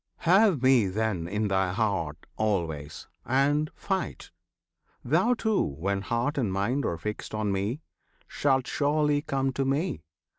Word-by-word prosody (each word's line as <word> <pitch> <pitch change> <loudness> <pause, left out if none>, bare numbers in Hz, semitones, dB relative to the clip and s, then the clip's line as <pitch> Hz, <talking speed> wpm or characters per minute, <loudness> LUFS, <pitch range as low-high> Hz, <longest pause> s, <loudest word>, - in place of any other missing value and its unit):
Have 185 - +4
Me, 130 -6 +5
then, 95 -3 -1
in 105 +3 -1
thy 95 -2 +1
heart 95 -7 -1
always! 85 -9 -2 0.2
and 145 +4 +2
fight! 190 -3 -3 0.7
Thou 180 - +3
too, 220 -2 +1
when 95 +8 -2
heart 120 +8 -1
and 110 -7 0
mind 110 +9 0
are 85 - -2
fixed 105 +4 -5
on 105 -1 -1
Me, 100 +9 -2 0.5
Shalt 135 -3 +1
surely 150 0 +1
come 135 -3 -1
to 135 - 0
Me! 135 - -1
120 Hz, 140 wpm, -27 LUFS, 95-145 Hz, 0.7 s, Me